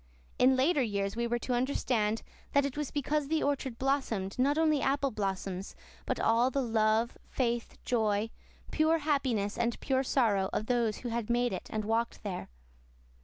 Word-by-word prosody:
In 260 +1 +6
later 280 +3 +3
years 200 -4 -1
we 235 0 0
were 240 +1 0
to 250 +1 -3
understand 240 -4 0 0.3
that 280 0 +4
it 280 - -3
was 295 -2 -2
because 290 0 -1
the 315 +1 +1
orchard 270 -4 -1
blossomed 255 -8 -1
not 280 +4 +3
only 310 -3 +3
apple 275 0 +1
blossoms 195 -2 -3 0.3
but - - -1
all 230 +3 +3
the 270 +1 0
love, 225 0 +2
faith, 235 -2 -1
joy, 220 -2 +1 0.4
pure 315 +1 +3
happiness 265 -9 0
and 235 0 0
pure 265 -1 +1
sorrow 215 -8 +2
of 215 - -1
those 235 -3 +1
who - - -1
had 235 -1 -3
made 240 -1 +2
it 185 - -6
and 215 -1 -2
walked 230 +2 -1
there. 190 -4 -4
240 Hz, 170 wpm, -31 LUFS, 215-275 Hz, 0.4 s, In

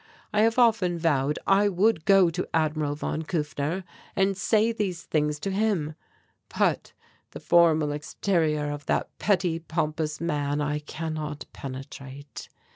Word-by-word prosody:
I 210 - +3
have 225 +2 +3
often 220 -8 +3
vowed 150 -3 +1
I 200 +1 +4
would 195 -2 +2
go 195 -4 +5
to 180 +3 -3
Admiral 155 -2 0
von 155 +1 -3
Kufner, 155 +2 -2 0.3
and 195 0 +2
say 215 +4 +2
these 200 -6 -3
things 150 -1 0
to 195 - -2
him. 190 -7 0 0.6
But - - +1 0.4
the - - -7
formal 160 -3 +4
exterior 150 -1 0
of 145 0 -7
that - - -1
petty 185 -5 +1
pompous 155 -2 -2
man 145 -3 -1
I 150 0 -1
cannot 155 -1 -5
penetrate. 135 +1 -9
160 Hz, 135 wpm, -26 LUFS, 150-190 Hz, 0.6 s, go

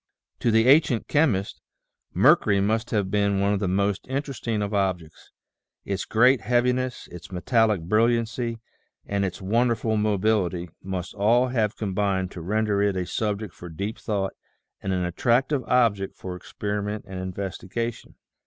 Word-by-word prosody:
To 120 - +1
the 115 +1 +4
ancient 135 -4 +4
chemists 125 -11 +1 0.5
mercury 100 -1 +4
must 110 +4 0
have 100 -4 0
been 100 -1 +2
one 100 +1 +2
of 100 - 0
the 100 - -1
most 100 +1 0
interesting 130 -5 -2
of 100 +1 -4
objects. 90 -5 -2 0.6
Its 100 -1 -2
great 125 +2 +4
heaviness, 125 +1 0
its 85 -1 -10
metallic 105 +1 +2
brilliancy, 115 +4 +1 0.5
and 100 0 -1
its 95 0 -4
wonderful 115 +1 +1
mobility, 100 -4 0
must 95 -2 -5
all 115 +5 +3
have 110 -4 0
combined 95 -2 -1
to 85 - -8
render 105 +3 0
it 100 -1 +1
a 90 - -1
subject 105 -1 -3
for 90 - -10
deep 100 +7 -5
thought 100 -3 -2 0.5
and 95 - -2
an 90 -1 0
attractive 125 - +1
object 110 -6 +2
for 90 -1 -7
experiment 105 +3 -4
and 95 -1 -6
investigation. 95 +4 -5
105 Hz, 145 wpm, -25 LUFS, 95-115 Hz, 0.6 s, the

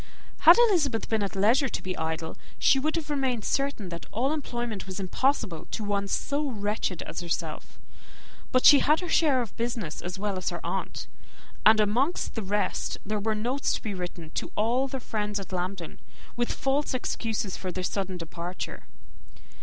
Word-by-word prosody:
Had - - +9
Elizabeth 340 - +3
been 220 -1 +1
at 200 -1 -2
leisure 235 +8 +4
to - - -4
be 185 0 -3
idle, 160 0 -3 0.2
she 270 - +4
would 310 +4 0
have 310 -3 -3
remained 260 -6 0
certain 275 -9 0
that 170 -1 -7
all 265 +6 +1
employment 240 -9 -3
was 190 +1 -5
impossible 195 - 0
to 220 - -3
one 200 -1 0
so 285 +7 -1
wretched 205 -5 -2
as - - -6
herself; 170 -1 -4 0.7
but 255 - +3
she 285 - +10
had 305 +4 +3
her 360 - -4
share 290 -6 +3
of 225 - -11
business 230 -8 -3
as 175 +2 -5
well 200 -1 -2
as 185 - -1
her 175 - -4
aunt, 190 +3 -3 0.6
and 220 0 +7
amongst 240 - +1
the 225 - -3
rest 205 +1 -1
there 210 +1 -1
were 215 +1 0
notes 245 +6 0
to - - -2
be 215 - -3
written 175 -3 -6
to - - -4
all 240 +5 +2
their 265 0 -4
friends 210 -3 -2
at 190 -1 -8
Lambton, 180 -1 -4 0.4
with 240 0 0
false 275 0 0
excuses 225 -5 -2
for 185 - -4
their 185 +1 -4
sudden 190 -1 -2
departure. 170 +2 -6
215 Hz, 180 wpm, -28 LUFS, 190-265 Hz, 0.7 s, she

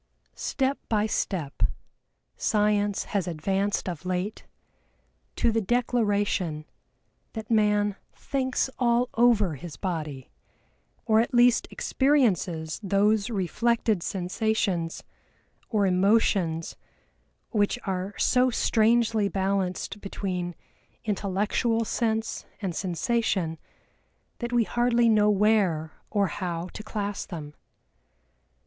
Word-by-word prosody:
Step 270 0 -1
by 215 -2 +2
step 180 -8 -2 0.7
Science 210 -2 +1
has 195 -3 -2
advanced 195 +5 -1
of 175 -3 -4
late 185 +3 -3 0.9
to 235 - +2
the 225 0 +1
declaration 205 -8 0 0.7
that 220 0 -6
man 210 -2 +3 0.2
thinks 260 -2 -1
all 240 0 +2
over 225 -7 +4
his 160 +2 -8
body, 155 - -4 0.7
or 220 -1 +4
at 235 +2 0
least 240 0 +5
experiences 190 - +1
those 205 +2 +2
reflected 220 +1 0
sensations 185 -2 -1 0.7
or 210 -3 +2
emotions 185 -3 +2 0.8
which 210 +1 +1
are 190 +1 -3
so 250 0 +3
strangely 225 -2 +2
balanced 195 +1 -1
between 180 -3 -4 0.5
intellectual 210 +3 0
sense 225 -1 -1
and 190 -5 -3
sensation 185 -3 -1 0.8
that 240 -1 -4
we 240 -1 +3
hardly 240 +1 +2
know 210 -2 +4
where 195 -6 +2 0.2
or 205 -2 +2
how 175 -1 -4
to - - -7
class 205 -2 -3
them. 155 -5 -8
205 Hz, 100 wpm, -26 LUFS, 185-225 Hz, 0.9 s, least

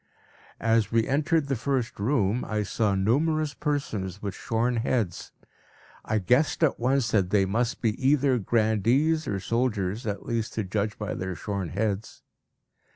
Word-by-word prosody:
As 115 -2 +2
we 115 -1 +2
entered 150 +2 +1
the 135 - 0
first 125 -2 -2
room, 110 -1 +1
I 105 -1 -1
saw 105 0 0
numerous 150 +9 +1
persons 110 - -3
with 100 -2 -4
shorn 120 +4 -1
heads. 115 -6 -1 0.7
I 110 - 0
guessed 125 - +2
at 155 - +2
once 125 -1 +1
that 95 -4 +2
they 100 -1 +3
must 115 +5 -1
be 115 - +3
either 135 -2 +3
grandees 115 +9 +2
or 100 - -1
soldiers, 110 -1 -1
at 100 -1 -3
least 115 -1 -2
to 110 - 0
judge 105 +2 -2
by 105 -1 -3
their 95 0 -4
shorn 100 -2 -4
heads. 105 +3 -3
115 Hz, 155 wpm, -26 LUFS, 100-130 Hz, 0.7 s, they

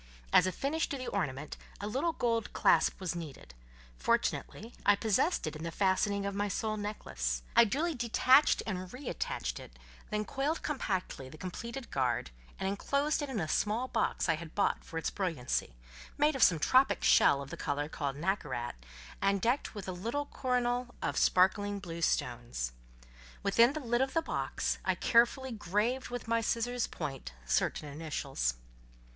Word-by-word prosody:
As 180 - +7
a - - +1
finish 285 - -1
to 280 - -2
the 255 - -5
ornament, 145 -7 -3 0.2
a 205 - -4
little 270 +10 0
gold 230 -5 -1
clasp - - +3
was 185 -2 -3
needed; 150 - -8 0.5
fortunately 225 - -1
I 205 - +6
possessed 220 - +1
it 155 - -4
in 155 - -7
the 165 - -3
fastening 200 +2 +1
of 200 - -2
my 205 +1 0
sole 215 +2 -1
necklace; 60 - -3
I 235 - +8
duly 310 +10 0
detached 255 +3 +4
and 185 -3 -4
re 265 +3 -9
attached - - -3
it, - - -12 0.3
then 210 0 -1
coiled 280 +6 -2
compactly 190 - -2
the 155 - -12
completed 235 - -6
guard; 125 - 0 0.3
and 190 - -2
enclosed 280 +10 0
it 290 - -3
in 245 -5 -2
a 160 - -1
small 220 +9 0
box - - 0
I 165 -2 +2
had 165 -1 -9
bought 200 - +1
for 165 - -7
its 165 - -1
brilliancy, 150 - -2 0.4
made 295 0 +3
of 265 - -2
some 170 - +6
tropic 260 - +3
shell 140 - +6
of 140 -1 -7
the - - -4
colour 145 +1 -2
called 140 -3 -3
"nacarat," 145 -8 -2 0.5
and 195 0 +2
decked 240 +6 0
with 200 -2 -6
a - - -2
little 230 +11 -2
coronal 245 -2 -1
of - - -1
sparkling 205 +2 +3
blue 170 -4 -6
stones. - - -1 0.7
Within 235 +3 +5
the 310 - -3
lid 240 -2 0
of 265 0 0
the 330 - +2
box, - - -2
I - - +1
carefully 245 +3 +3
graved 220 +5 -1
with 245 -2 -5
my 230 0 +2
scissors' 240 +2 0
point 135 - -6
certain 105 - 0
initials. 140 - -2
205 Hz, 175 wpm, -32 LUFS, 165-245 Hz, 0.7 s, I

